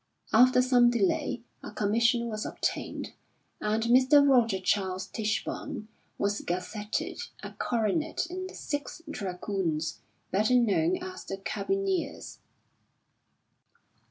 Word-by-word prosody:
After 250 +2 +6
some 245 -1 +5
delay 235 +1 0 0.2
a - - -7
commission 230 +3 +2
was 215 -2 -3
obtained - - -3 0.5
and 215 +1 0
Mr. 260 +4 +6
Roger 230 -7 +4
Charles 190 0 0
Tichborne 215 0 -3 0.3
was 200 +1 0
gazetted 205 +4 -3 0.2
a - - -6
coronet 240 - -1
in 370 +2 -5
the 375 - -11
Sixth 290 +3 -4
Dragoons, 180 - -2 0.3
better 215 +6 +3
known 250 - +3
as 370 0 -7
the 195 - -4
Carbineers. 375 - -2
225 Hz, 105 wpm, -29 LUFS, 200-260 Hz, 0.5 s, After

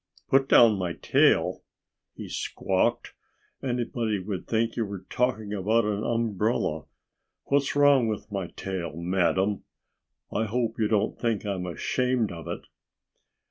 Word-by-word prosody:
"Put 135 0 +3
down 110 -4 +6
my 90 -2 -2
tail!" - - +2 0.5
he - - -7
squawked. - - -1 0.5
"Anybody 120 -4 -1
would 95 -1 -5
think 115 0 0
you 115 - 0
were 100 -3 -7
talking 110 -4 0
about 105 +3 +2
an 105 0 -1
umbrella. 110 -8 0 0.6
What's 140 0 +1
wrong 145 -4 +5
with 105 0 -4
my 95 -3 -3
tail, 90 -4 -5
madam? 90 +3 0 0.7
I 110 - +1
hope 115 +1 -2
you 110 - +3
don't 105 -2 0
think 115 -3 -1
I'm 95 -3 -3
ashamed 125 +6 0
of 85 -1 -8
it." - - -4
105 Hz, 135 wpm, -27 LUFS, 95-120 Hz, 0.7 s, down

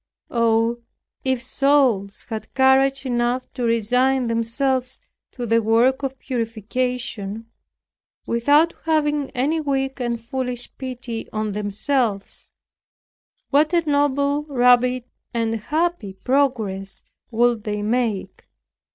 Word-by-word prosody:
Oh, 230 0 +2 0.4
if 260 -2 0
souls 255 -8 +2
had 220 -1 -5
courage 265 +1 +4
enough 245 0 0
to - - -6
resign 250 +3 +2
themselves 250 +3 -1 0.3
to 245 - -4
the 230 0 +3
work 235 +5 +3
of 270 -1 -3
purification, 230 -2 -3 0.8
without 290 +8 +3
having 295 -3 +1
any 290 +6 +1
weak 270 -2 -1
and 240 -2 -1
foolish 245 +1 -4
pity 250 -3 -5
on 215 -1 -2
themselves, 210 +1 -1 1.0
what 300 +4 +3
a 335 -2 +1
noble, 285 0 +2
rapid 250 -2 +3 0.3
and 225 -1 0
happy 300 - -1
progress 215 -6 -1 0.3
would 235 -1 +2
they 210 -1 -3
make! 225 -2 -2
250 Hz, 105 wpm, -22 LUFS, 225-270 Hz, 1.0 s, courage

